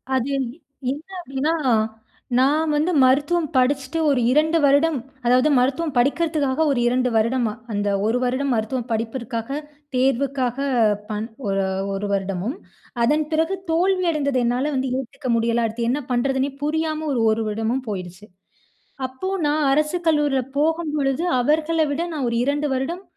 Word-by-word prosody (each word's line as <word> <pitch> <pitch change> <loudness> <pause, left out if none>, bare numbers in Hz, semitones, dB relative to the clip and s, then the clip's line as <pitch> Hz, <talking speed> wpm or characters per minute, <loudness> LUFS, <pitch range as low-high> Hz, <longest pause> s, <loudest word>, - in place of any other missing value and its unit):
அது 260 +2 0
என் 265 - -1 0.4
என்ன 295 +4 -6 0.2
அப்படின்னா, 280 +1 -1 0.9
நான் 300 +4 +2
வந்து 310 +5 +1
மருத்துவம் 295 +6 +3
படிச்சுட்டு 270 +4 +1
ஒரு 275 - +2
2 315 +3 +3
வருடம், 285 +2 +3 0.3
அதாவது 255 +5 +4
மருத்துவம் 280 +4 0
படிக்கிறதுக்காக 290 +1 +1
ஒரு 250 - +1
2 250 +1 +2
வருடமா, 230 -1 +1 0.2
அந்த 205 0 -1 0.2
1 230 +3 +2
வருடம் 260 +2 0
மருத்துவம் 235 +2 -2
படிப்பிற்காக, 230 +1 -3 0.5
தேர்வுக்காக 260 -1 +1 0.5
பண் 215 +1 -3 0.2
ஒரு 195 0 +1 0.3
1 200 +1 -3
வருடமும், 195 - -2 0.5
அதன் 300 +5 +2
பிறகு 325 +5 +1 0.2
தோல்வி 370 +2 +2
அடைந்தது 280 -4 0
என்னால 255 +5 0
வந்து 260 0 -1
ஏத்துக்க 255 0 -6
முடியல. 230 0 +1
அடுத்து 230 +1 -3
என்ன 290 +3 -1
பண்றதுன்னே 265 +2 +1
புரியாம 315 +1 -1
ஒரு 235 - 0
1 220 +1 0
வருடமும் 225 +5 -1
போயிடுச்சு. 185 +1 -6 0.8
அப்போ 260 +9 -6 0.2
நான் 295 0 +1
அரசு 305 +4 +2
கல்லூரியில 295 -4 +2 0.2
போகும்பொழுது 305 -2 0 0.2
அவர்கள 315 +5 +1
விட 285 +4 -1
நான் 290 -4 -2
ஒரு 235 - -2
2 290 +1 0
வருடம் 335 +9 -3
270 Hz, 140 wpm, -22 LUFS, 240-305 Hz, 0.9 s, அதாவது